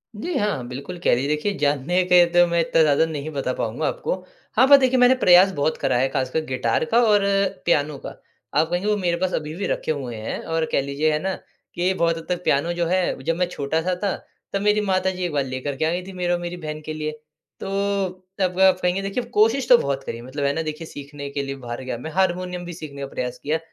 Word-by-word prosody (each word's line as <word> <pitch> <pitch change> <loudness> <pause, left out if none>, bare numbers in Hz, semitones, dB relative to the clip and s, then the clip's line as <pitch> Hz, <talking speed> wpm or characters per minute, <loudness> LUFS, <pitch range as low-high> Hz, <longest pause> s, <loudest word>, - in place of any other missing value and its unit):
जी 335 +13 -4
हाँ, 195 -13 -1
बिल्कुल 140 +8 -7
कह - - +4
रही 130 +3 -1
देखिए 150 +7 0
जानने 150 +4 +1
के 180 -1 +6
तो 175 0 +6
मैं 170 0 +1
इत्ता 165 0 +2
ज़्यादा 150 +1 +4
नहीं 150 0 -4
बता 135 -3 -2
पाऊँगा 120 +7 -2
आपको - - -2 0.4
हाँ, 260 +4 +5
पर 280 - +9
देखिए 260 -1 +2
मैंने 250 +1 +6
प्रयास 185 -4 +6
बहुत 145 +2 0
करा 130 -2 +1
है 130 - +2
ख़ासकर 135 +3 0
गिटार 130 +2 0
का 230 +7 +3
और 210 -3 +4 0.4
पियानो 150 -3 +1
का। - - -3 0.5
आप 160 - +3
कहेंगे 175 +4 -1
वो 210 - +3
मेरे 175 -3 0
पास 185 +1 -1
अभी 155 0 -3
भी 200 - -3
रखे - - -1
हुए 130 -6 -4
हैं 110 0 -4
और 165 -1 0
कह - - +2
लीजिए 140 +3 0
है 150 - 0
ना, 190 0 -1 0.4
कि 180 +2 +1
बहुत 165 -2 +1
हद 165 - -8
तक 180 0 -2
पियानो 165 +5 +1
जो 170 0 -1
है 180 -7 0
जब 165 +2 0
मैं 180 - +1
छोटा-सा 160 +6 -1
था 200 - +1 0.4
तब 195 - 0
मेरी 210 0 +3
माताजी 185 -1 0
एक 175 - -2
बार 140 -2 +1
लेकर 130 +2 -4
के 155 - 0
आ 160 - +1
गई 180 - -1
थी 195 - -7
मेरे 180 -1 -1
और 175 - 0
मेरी 175 0 -5
बहन 155 -2 -6
के 155 - -4
लिए। 155 0 -3 0.5
तो - - -5 0.7
तब 185 -1 0
आप 190 -1 +5
कहेंगे 180 +2 +1
देखिए 195 +5 -2
कोशिश 235 +4 +3
तो 245 - +9
बहुत 140 -7 -2
करी 115 - -5
है 120 - -10
मतलब 140 +3 -5
है 140 - +2
ना 165 - -1
देखिए 155 +1 -5
सीखने 140 0 -8
के 140 0 -3
लिए 135 0 -4
बाहर 120 -1 -7
गया 130 -2 -4
मैं 160 +6 -7
हारमोनियम 180 -1 -1
भी 175 - -6
सीखने 145 -4 -8
का 140 - -3
प्रयास 125 -2 -4
किया 155 +3 0
165 Hz, 250 wpm, -23 LUFS, 140-185 Hz, 0.7 s, पर